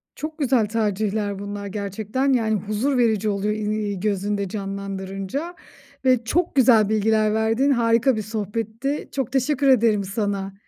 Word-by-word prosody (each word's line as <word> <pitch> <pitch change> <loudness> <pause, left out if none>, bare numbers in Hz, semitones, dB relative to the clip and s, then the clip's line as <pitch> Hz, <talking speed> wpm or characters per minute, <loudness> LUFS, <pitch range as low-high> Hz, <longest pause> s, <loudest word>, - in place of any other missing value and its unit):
Çok 310 +1 -6
güzel 260 -6 +2
tercihler 210 -2 -1
bunlar 200 0 -5
gerçekten. 210 +6 -1
Yani, 220 -3 +1
huzur 215 +7 -1
verici 220 -3 +2
oluyor, 205 +1 0
i 215 - -4
iii, 210 -2 -2
gözünde 200 0 -1
canlandırınca 195 - -5 0.5
ve 255 -2 +4
çok 335 +7 0
güzel 230 -5 +5
bilgiler 215 0 +2
verdin, 225 +6 +2
harika 235 +1 +3
bir 215 - -2
sohbetti. 220 +6 -3
Çok 265 -2 -3
teşekkür 275 +1 +1
ederim 225 -5 +4
sana. 195 -1 -3
215 Hz, 140 wpm, -23 LUFS, 200-245 Hz, 0.5 s, güzel